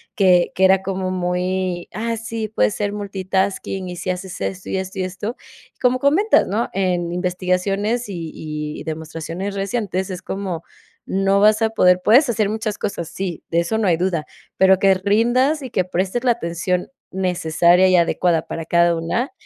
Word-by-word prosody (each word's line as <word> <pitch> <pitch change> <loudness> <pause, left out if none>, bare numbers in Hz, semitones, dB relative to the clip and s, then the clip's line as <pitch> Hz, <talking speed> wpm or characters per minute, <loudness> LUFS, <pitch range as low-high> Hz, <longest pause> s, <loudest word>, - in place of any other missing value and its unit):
que 180 -3 +4
que 190 - +1
era 190 0 +5
como 190 -1 -3
muy: 180 0 -2
"Ah, 230 +3 -2
sí, 225 0 -4
puedes 105 - +1
ser 205 -1 -2
multitasking, 195 -1 -2
y 180 - -7
si 185 +2 -4
haces 185 0 -4
esto, 190 0 -4
y - - -1
esto, 190 +1 -5
y - - 0
esto". 200 +5 -4 0.4
Y, - - -42
como 250 0 +2
comentas, 315 +11 +3
¿no?, 215 +5 -1
en 180 -3 0
investigaciones 185 +5 -1
y 170 -5 -5
y 150 -1 -5
demostraciones 165 +5 -5
recientes 195 -2 -2
es 185 -2 -5
como 185 -3 -4 0.4
no 195 +1 +1
vas 215 +1 +5
a 225 - +3
poder. 180 -4 +4
Puedes 250 +5 +5
hacer 215 -3 +1
muchas 215 -1 -3
cosas, 170 -6 -4
sí, 175 -1 -5
de 170 - +2
eso 195 +6 -1
no 215 -3 +1
hay 165 - +3
duda. 170 -3 -1 0.3
Pero 190 0 +5
que 195 0 +5
rindas 240 +10 +2
y 260 - -6
que 185 - 0
prestes 185 +6 -2
la 250 - +4
atención 180 -3 -2 0.2
necesaria 180 -1 +3
y 185 - +4
adecuada 170 -1 +2
para 165 - -5
cada 170 +1 +3
una, 165 +11 -2
190 Hz, 180 wpm, -20 LUFS, 175-210 Hz, 0.4 s, era